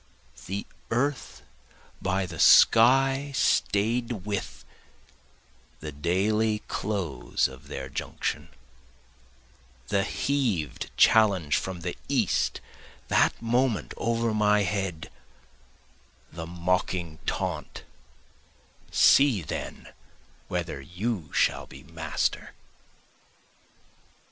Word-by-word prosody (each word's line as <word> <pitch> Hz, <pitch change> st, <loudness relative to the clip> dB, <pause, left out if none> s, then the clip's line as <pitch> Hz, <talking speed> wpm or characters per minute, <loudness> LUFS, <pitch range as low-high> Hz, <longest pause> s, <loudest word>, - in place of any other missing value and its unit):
The 100 Hz, +2 st, -4 dB, 0.2 s
earth 130 Hz, +3 st, -2 dB, 0.6 s
by 95 Hz, +1 st, 0 dB
the 85 Hz, -3 st, -8 dB
sky 135 Hz, +4 st, +5 dB
staid 115 Hz, -2 st, +1 dB
with, 80 Hz, -12 st, -4 dB, 1.1 s
the 75 Hz, 0 st, -6 dB
daily 105 Hz, +8 st, 0 dB
close 90 Hz, -, -1 dB
of 65 Hz, -1 st, -13 dB
their 65 Hz, -1 st, -6 dB
junction, 75 Hz, +3 st, -4 dB, 1.4 s
The 100 Hz, -1 st, +2 dB
heav'd 105 Hz, -, -1 dB
challenge 95 Hz, -9 st, +4 dB
from 95 Hz, -2 st, -3 dB
the 90 Hz, +1 st, -4 dB
east -, -, +1 dB, 0.5 s
that -, -, +3 dB
moment 120 Hz, 0 st, 0 dB
over 115 Hz, -1 st, 0 dB
my 105 Hz, -1 st, +3 dB
head, 95 Hz, -4 st, -3 dB, 1.2 s
The 80 Hz, 0 st, -7 dB
mocking 90 Hz, -1 st, -2 dB
taunt, -, -, -3 dB, 1.1 s
See 135 Hz, -, +5 dB
then -, -, -6 dB, 0.6 s
whether 85 Hz, -5 st, -3 dB
you 90 Hz, -, -4 dB
shall -, -, +1 dB
be -, -, -13 dB
master! 80 Hz, -2 st, -3 dB
95 Hz, 85 wpm, -27 LUFS, 85-115 Hz, 1.4 s, sky